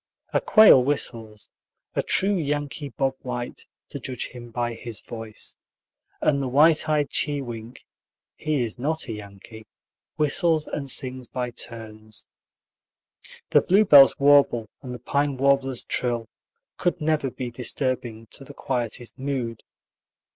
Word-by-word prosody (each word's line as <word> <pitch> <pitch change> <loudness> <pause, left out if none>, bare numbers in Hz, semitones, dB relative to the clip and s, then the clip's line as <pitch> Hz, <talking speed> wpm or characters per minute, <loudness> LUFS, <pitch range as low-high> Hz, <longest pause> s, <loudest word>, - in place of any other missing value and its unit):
A - - +2
quail 215 - +7
whistles, 115 -6 -3 0.4
a - - +1
true 200 +2 +3
Yankee 145 -2 -3
Bob 135 +3 -1
White, 125 -2 -6 0.2
to - - -6
judge 125 -3 -5
him 120 -1 -10
by 120 0 -2
his 115 -2 -7
voice, 115 -2 -10 0.6
and 140 -2 +2
the 135 - -2
white 150 +5 +4
eyed 150 -2 +1
chewink 125 -5 -3 0.5
(he 150 -4 -1
is 115 0 -5
not 160 +5 -2
a - - -4
Yankee) 105 +1 -11 0.5
whistles 155 +1 +1
and 140 -2 -5
sings 130 -2 -2
by 125 0 -4
turns. 110 -2 -8 1.3
The - - +6
bluebird's 180 -8 +7
warble 140 -6 +4
and 130 - -8
the 125 - -5
pine 140 +3 -1
warbler's 135 -1 +2
trill 120 -2 -2 0.5
could 175 0 0
never 155 -3 0
be 125 -1 -6
disturbing 125 -2 -2
to - - -7
the - - -12
quietest 120 -2 -4
mood. 130 -5 -3
130 Hz, 135 wpm, -24 LUFS, 115-145 Hz, 1.3 s, quail